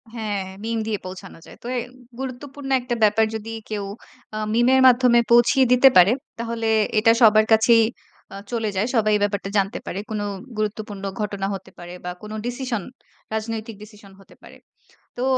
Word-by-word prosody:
হ্যাঁ, 215 -3 -3 0.2
মিম 230 0 -2
দিয়ে 215 -2 -1
পৌঁছানো 185 +1 -9
যায়। - - -14
তো - - -7
এ - - +1 0.4
গুরুত্বপূর্ণ 270 +2 -7
একটা 245 -1 -3
ব্যাপার 215 +1 +4
যদি 220 +1 -6 0.2
কেউ 210 -2 -3 0.5
আ - - -3 0.2
মিমের 255 +3 +4
মাধ্যমে 245 -1 +5
পৌঁছিয়ে 240 +3 +5
দিতে 260 +2 +7
পারে, 180 +3 +7 0.3
তাহলে 230 -1 -3 0.3
এটা 225 +1 +5
সবার 215 -1 +6
কাছেই 225 +1 +5 0.5
আ - - -8 0.2
চলে 225 -3 -1
যায়। 200 +4 0
সবাই 215 -1 +2
এই 210 - 0
ব্যাপারটা 200 -1 -2
জানতে 195 0 0
পারে। 195 - -4
কোন 215 -1 -3 0.4
গুরুত্বপূর্ণ 210 -1 -4 0.2
ঘটনা 200 -2 -2
হতে 190 -1 -8
পারে 175 0 -9
বা 180 - -3
কোন 210 0 -9
ডিসিশন, 245 -4 -3 0.5
রাজনৈতিক 220 0 -4
ডিসিশন 210 -2 -15
হতে 195 - -19
পারে। - - -14 0.6
তো 245 - -4
220 Hz, 170 wpm, -22 LUFS, 205-240 Hz, 0.6 s, দিতে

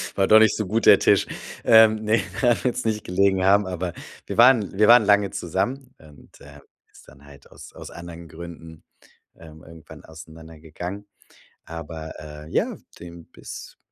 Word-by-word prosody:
war 95 - +1
doch 110 - +7
nicht 110 0 +3
so 110 - -3
gut, 110 +5 -2
der - - +8
Tisch. - - +2 0.4
Ähm, 110 -1 +5
ne, 110 +1 +1 0.2
daran 120 -3 +1
wird's 125 0 -2
nicht 110 -1 -2
gelegen 95 +1 0
haben, 100 +1 +3
aber 90 -1 -5 0.3
wir - - -7
waren 120 -5 +4
wir 105 +1 +4
waren 120 -2 +6
lange 100 -1 +3
zusammen 120 - -4
und, 75 -3 -19
ähm, - - -15 0.3
ist - - -20
dann 70 +1 -18
halt 70 -1 -18
aus - - -14
aus - - -11
anderen 85 -1 -11
Gründen, 80 -1 -12 0.5
ähm, 80 -1 -15
irgendwann 80 -1 -15
auseinandergegangen. 80 +4 -11 0.6
Aber, 80 -1 -9
äh, 75 0 -11
ja, - - -1 0.2
dem 85 -1 -12
bis - - -12
90 Hz, 165 wpm, -22 LUFS, 80-110 Hz, 0.6 s, der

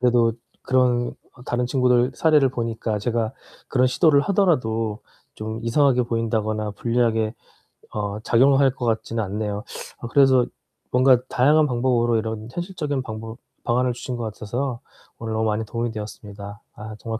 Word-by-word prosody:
그래도 120 -2 +3 0.3
그런 125 -2 +2 0.3
다른 120 0 0
친구들 125 0 +3
사례를 150 -4 +4
보니까 115 -3 -2
제가 115 +1 -1 0.4
그런 130 0 +3
시도를 145 +3 +4
하더라도 115 - +1 0.4
좀 110 +1 -5
이상하게 125 +1 +3
보인다거나 110 -2 -1
불리하게 115 0 0 0.6
어 105 0 -3
작용을 135 +4 +4
할 135 -1 +4
것 125 -1 -5
같지는 115 0 -1
않네요. 105 +1 -3 0.4
아 120 - -6
그래서 130 -2 +5 0.5
뭔가 130 +1 +5
다양한 150 +5 +4
방법으로 120 -2 +1
이런 110 0 -4
현실적인 160 -6 -3
방법 110 -1 -7 0.3
방안을 125 +1 +1
주신 125 0 -5
것 120 - -4
같아서요 120 +4 -3 0.4
오늘 110 -1 -4
너무 110 0 0
많이 110 0 0
도움이 115 +2 -3
되었습니다. 105 -1 -8 0.2
아 110 0 -8
정말 115 -1 -4
120 Hz, 355 characters per minute, -23 LUFS, 110-130 Hz, 0.6 s, 그래서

